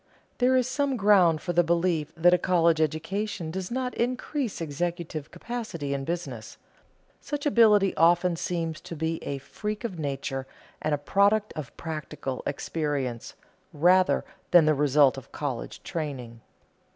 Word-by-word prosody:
There 255 +1 +4
is 255 -1 +2
some 275 0 0
ground 190 -7 +4
for 175 - -2
the 175 +1 +4
belief 170 -2 0
that 175 +2 +5
a 180 - +4
college 170 -3 +3
education 165 +3 -2
does 185 +1 -4
not 255 +1 -2
increase 255 +1 -2
executive 165 -1 -4
capacity 175 -8 -5
in 135 -1 -3
business. 140 -10 -5 0.6
Such 290 0 -5
ability 215 -8 +5
often 175 +1 +4
seems 165 -2 -3
to 170 - -8
be 160 +1 -2
a 140 - -3
freak 210 - -5
of 190 -8 -4
nature 135 -2 -3 0.3
and 155 -1 +1
a - - -4
product 200 +8 +2
of 140 -7 -7
practical 155 -4 -5
experience, 140 -5 -3 0.4
rather 180 +5 +3 0.2
than 175 -3 +7
the 155 - +4
result 140 -2 +3
of 135 - -19
college 135 -5 -5
training. 130 -9 -5
170 Hz, 145 wpm, -27 LUFS, 150-200 Hz, 0.6 s, than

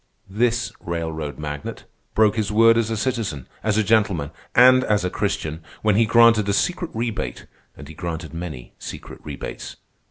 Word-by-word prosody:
This 120 +3 0
railroad 80 -4 -4
magnate 75 -1 -6 0.3
broke 110 -1 +4
his 110 -2 -1
word 115 +2 +6
as 115 -1 +1
a 110 - -1
citizen, 105 - -2 0.2
as 110 -1 +1
a 110 - +3
gentleman, 100 -9 +2 0.2
and 130 +1 +7
as 105 -5 +1
a 90 - -1
Christian, 80 +1 -2 0.2
when 105 -2 +3
he 115 +1 +4
granted 115 -3 +5
a - - +2
secret 175 - 0
rebate, 110 - -3 0.3
and 75 - -10
he 80 - -10
granted 80 0 -5
many 80 -7 -7
secret - - -8
rebates. - - -7
105 Hz, 165 wpm, -22 LUFS, 80-115 Hz, 0.3 s, and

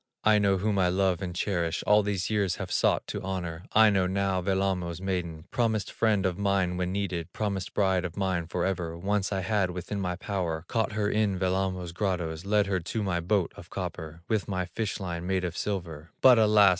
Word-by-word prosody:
Aino, 105 -2 +4
whom 100 +1 0
I 90 - +4
love 95 -1 +1
and 90 -2 -4
cherish, 85 -3 -1
All 105 0 +5
these 100 -3 -1
years 100 -4 +1
have - - -6
sought - - +2
to - - -5
honor, 90 -2 -4
Aino, 105 -4 +5
now 95 0 0
Wellamo's 95 -3 0
maiden, 90 -4 -3
Promised 110 -5 0
friend 105 -4 +1
of 95 0 -1
mine 100 -3 +1
when 90 0 -1
needed, 90 -3 -2
Promised 100 -4 -3
bride 95 -3 +2
of 90 -1 -5
mine 95 -4 0
forever, 85 -1 -2
Once 100 +2 0
I 95 -1 0
had 95 -1 +1
within 90 +3 -4
my 90 -2 -1
power, 90 -4 -3
Caught 110 -2 0
her 105 -1 0
in 105 -2 +1
Wellamo's 95 -1 -1
grottoes, 90 -3 -2
Led 105 0 +3
her 95 -2 0
to 105 +6 -3
my 90 -3 0
boat 90 +1 +1
of - - -12
copper, 80 +1 -6
With 110 -3 0
my 95 -2 -1
fish 105 +4 -3
line 90 -2 -4
made 95 -1 0
of 85 -1 -4
silver; 85 -7 -4
But 125 -3 +7
alas! 105 -2 +6
95 Hz, 195 wpm, -28 LUFS, 90-100 Hz, -, But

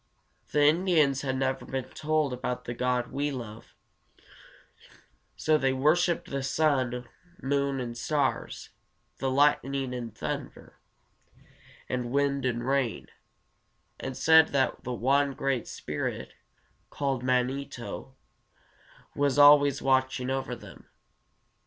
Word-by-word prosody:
The 150 - +3
Indians 155 -4 +3
had 130 -2 -2
never 135 0 -1
been 130 -1 -5
told 155 -3 0
about 125 0 -4
the 120 - -4
God 125 0 -1
we 145 +2 -1
love, 115 -5 -8 1.6
so 155 -1 +2
they 135 -1 +1
worshiped 165 +6 +1
the 140 0 -2
sun, 130 -4 0 0.3
moon, 140 0 0
and 120 -2 -5
stars, 140 +6 -2 0.5
the 135 - -1
lightning 135 -1 +1
and 115 -3 -6
thunder, - - -6 1.1
the 125 - -1
wind 140 +2 0
and 120 -1 -1
rain, 135 -4 -1 0.9
and 130 -1 -5
said 160 0 +6
that 135 -2 0
one 135 +3 +1
great 135 -3 -2
spirit, - - -5 0.6
called 135 -3 -2
Man´i 130 +2 0
to, 125 +2 -8 1.0
was 145 -1 +1
always 145 -1 +6
watching 130 -1 +1
over 135 0 -2
them. - - -14
135 Hz, 115 wpm, -28 LUFS, 125-145 Hz, 1.6 s, said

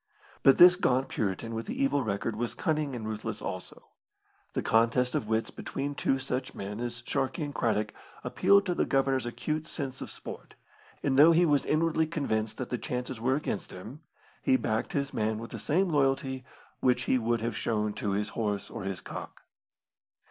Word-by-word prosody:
But 135 - +6
this 180 +1 +9
gaunt 130 -7 +1
Puritan 110 +2 -2
with 115 0 -4
the 255 +4 -4
evil 275 - +2
record 105 +1 -2
was 120 +2 -3
cunning 155 -5 0
aid 120 - -5
ruthless 110 0 -4
also. 95 - -7 0.6
The - - -1
contest 120 +3 +3
of 105 - -1
wits 110 +1 0
between 140 +1 -4
two 135 -1 +1
such 130 -1 -3
men 100 +2 -5
as 120 0 -4
Sharkey 135 +3 -1
and 145 -1 -4
Craddock 110 -4 0 0.3
appealed 200 0 +4
to 180 - +1
the - - +1
Governor's 135 -2 +1
acute 155 +6 -3
sense 135 -4 -5
of - - -5
sport, - - -9 0.5
and 135 -1 +2
though 160 +3 +9
he 175 +2 +5
was 145 -3 +2
inwardly 160 0 +2
convinced 110 -9 -1
that 130 - -5
the 125 - -1
chances 125 -1 -4
were 130 +3 +2
against 145 -8 -3
him, 110 - -9 0.4
he 130 - +4
backed 110 -2 -1
his 140 -1 -1
man 110 0 0
with 115 +1 -7
the - - -6
same 180 +5 +1
loyalty 135 -3 +1 0.4
which 125 -1 +2
he 130 - +2
would 115 0 0
have 115 -1 -2
shown 105 -2 0
to 100 -1 -2
his 105 +1 -1
horse 105 -3 -2
or 110 -4 -6
his 95 -2 -3
cock. - - -8
125 Hz, 190 wpm, -29 LUFS, 110-145 Hz, 0.6 s, this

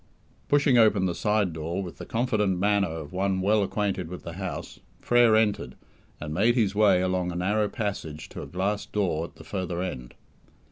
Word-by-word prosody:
Pushing 140 -4 +4
open 105 -4 +4
the 90 - 0
side 105 -1 0
door 80 +4 -3
with 90 - -9
the - - -8
confident 110 -6 0
manner 100 +1 +2
of 80 -2 -7
one 95 0 0
well 105 +3 +3
acquainted 100 -3 -1
with 90 - -8
the 85 - -7
house, 95 0 -6 0.2
Frere 120 -2 +4
entered, 105 - +1 0.4
and 75 0 -5
made 110 +8 +3
his 105 -6 +2
way 100 -3 +4
along 90 -1 0
a - - -7
narrow 105 +4 +1
passage 95 - -4
to - - -8
a - - -7
glass 100 +3 -2
door 90 -6 -1
at - - -13
the - - -13
further 90 0 -4
end. 75 -10 -5
95 Hz, 190 wpm, -26 LUFS, 90-105 Hz, 0.4 s, Pushing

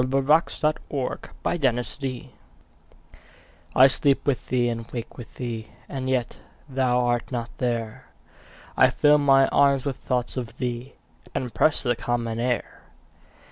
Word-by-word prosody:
John 125 - -1
Clare 135 +5 +4
To 150 -4 -3 0.7
Mary 130 -1 -4 1.5
I 130 - +8
SLEEP 140 0 +2
with 140 -3 -1
thee, 125 -1 +1
and 115 -1 -4
wake 120 -2 -6
with 120 - -11
thee, 115 -3 -5 0.2
And 130 -2 -4
yet 125 -2 -1 0.3
thou 130 -2 +1
art 120 0 -1
not 120 -2 -4
there; 115 -3 -2 0.7
I - - +6
fill 150 0 +4
my 135 -1 +5
arms 140 -2 +3
with 140 -3 -2
thoughts 125 0 -2
of 120 -3 -5
thee, 125 0 -4 0.4
And 125 -4 -3
press 145 +11 +2
the 120 -2 +1
common 115 -1 -2
air. 120 0 -2
125 Hz, 140 wpm, -25 LUFS, 120-135 Hz, 1.5 s, I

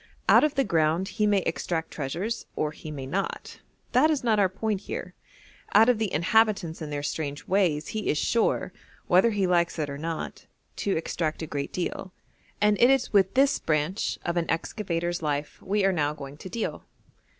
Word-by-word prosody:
Out - - +7
of 305 -1 +1
the 275 - +3
ground 170 0 +1
he 210 +2 0
may 205 -2 +3
extract 165 -2 -2
treasures, 170 - -3
or 150 - -1
he 155 - -10
may 140 -3 -6
not 185 +9 -4 0.3
that 265 +6 +5
is 300 -5 0
not 220 -3 +3
our 195 -2 +4
point 205 +1 -2
here - - -6 0.6
out 220 +3 +7
of 240 -3 +3
the 215 -4 -1
inhabitants 185 -1 +2
and 150 -1 -5
their 145 0 -3
strange 145 -1 -4
ways 175 -6 +1
he 220 -1 -3
is 150 - +1
sure, 230 +8 +1 0.3
whether 185 +6 +5
he 205 -3 0
likes 175 -2 +2
it 150 -3 -2
or 140 - -6
not, 165 0 -5 0.3
to 200 - 0
extract 160 0 -2
a - - -2
great 140 -2 -4
deal, 185 +1 -4 0.5
and 210 -1 +3
it 245 - +7
is 270 -4 +2
with 195 0 +3
this 275 +1 +4
branch 155 +5 -1
of 175 0 -1
an 170 - -1
excavator's 175 0 -2
life 145 -1 -3
we 200 +1 0
are 195 - +3
now 150 -3 0
going 140 -1 -8
to 175 +5 -9
deal. 230 +4 -3
180 Hz, 195 wpm, -27 LUFS, 155-210 Hz, 0.6 s, Out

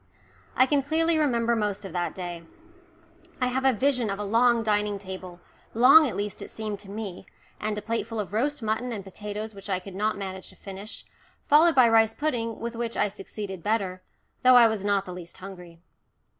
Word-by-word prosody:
I 255 - +5
can 280 +1 +2
clearly 320 +3 +2
remember 235 -5 +2
most 205 -2 -2
of 190 - -8
that 175 -1 -2
day. 175 -2 -6 1.0
I 250 -1 +1
have 265 +1 -1
a 265 - +6
vision 250 -1 +1
of 195 - -2
a 210 - -4
long 230 +3 +3
dining 210 -1 +1
table, 185 -2 -9 0.4
long 275 +6 +8
at 240 - -4
least 205 0 -4
it - - -7
seemed 215 -2 -5
to 200 - -10
me, 200 -3 -6 0.3
and 215 0 -2
a 210 - -5
plateful 225 0 -3
of 200 -2 -4
roast 280 +4 0
mutton 220 +3 -1
and 210 -4 -5
potatoes 210 +3 -6
which 195 0 -11
I 190 - +1
could 185 +1 -9
not 210 +2 -1
manage 190 -1 -6
to - - -14
finish, 195 +3 -9 0.4
followed 315 +3 +6
by 255 -3 +7
rice 225 -1 +4
pudding 235 -7 -2
with 235 0 -5
which 230 0 -3
I 210 - +2
succeeded 195 -1 -7
better, 195 -2 -1 0.4
though 255 0 +7
I 240 -1 +9
was 220 -3 -2
not 200 -1 +1
the 180 - -7
least 175 -1 -9
hungry. 180 -3 -11
215 Hz, 200 wpm, -26 LUFS, 195-235 Hz, 1.0 s, I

